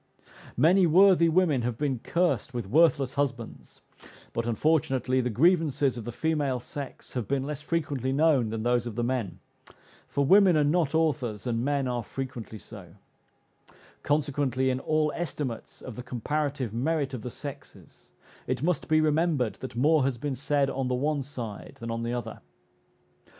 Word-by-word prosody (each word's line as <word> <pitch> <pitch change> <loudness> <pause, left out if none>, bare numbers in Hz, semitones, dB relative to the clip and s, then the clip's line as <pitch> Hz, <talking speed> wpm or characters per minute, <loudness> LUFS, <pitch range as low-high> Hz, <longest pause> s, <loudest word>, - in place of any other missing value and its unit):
Many 175 +7 +5
worthy 180 0 +6
women 160 -6 +2
have 120 -1 -2
been 140 -3 -1
cursed 170 -3 0
with 120 -4 -2
worthless 140 0 +3
husbands; 125 -5 -4 0.5
but, 115 0 -2
unfortunately, 130 0 +1
the 125 - -1
grievances 145 - +2
of 115 -3 -7
the 120 - -4
female 145 -1 -1
sex 140 +2 -8
have 125 -5 -3
been 135 -1 0
less 145 0 -5
frequently 145 -5 -2
known 140 -5 +3
than 110 0 -3
those 120 0 +1
of 115 - -6
the 120 - -1
men; 120 -8 -2 0.7
for 140 0 0
women 190 +1 +6
are 150 - +4
not 155 0 +1
authors, 135 -10 0
and 120 -1 -1
men 140 -1 0
are 120 -1 -1
frequently 120 -2 -6
so; 95 -4 -12 1.1
consequently, 140 -3 0
in 130 - -1
all 155 +1 +1
estimates 145 -8 -5
of 125 - -8
the 125 - -6
comparative 130 0 -2
merit 140 +3 -1
of 125 - -4
the 125 - -5
sexes, 140 +2 -11 0.4
it 130 - -2
must 175 -2 0
be 155 0 +4
remembered 155 -6 +1
that 130 - -7
more 150 +4 +3
has 130 -2 0
been 145 +3 -3
said 140 +2 +1
on 135 -1 -2
the 125 - 0
one 145 +3 0
side 120 -6 -7
than 115 0 -5
on 115 0 -3
the 115 0 -2
other. 120 -2 -5
135 Hz, 165 wpm, -27 LUFS, 120-155 Hz, 1.1 s, worthy